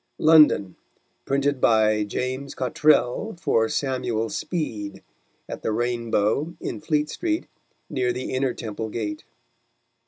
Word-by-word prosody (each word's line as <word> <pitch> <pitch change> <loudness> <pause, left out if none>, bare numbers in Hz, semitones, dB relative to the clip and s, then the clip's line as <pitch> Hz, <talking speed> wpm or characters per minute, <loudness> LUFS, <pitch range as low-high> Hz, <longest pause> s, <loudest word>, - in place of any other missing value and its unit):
London: 150 - +5 0.5
Printed 140 -1 0
by 110 -2 +3
Ja: 130 +5 -3
Cottrell 150 - +2
for 115 -10 +2
Samuel 125 -5 -1
Speed, 105 - -4 0.4
at - - -7
the - - -1
Rain 120 +1 -1
Bow 110 +11 +1
in - - -5
Fleetstreet, 155 - -1 0.4
near 125 -2 0
the 125 +2 -4
Inner 130 0 0
Temple 110 -1 -5
Gate. 105 -2 -4
125 Hz, 115 wpm, -24 LUFS, 110-150 Hz, 0.5 s, London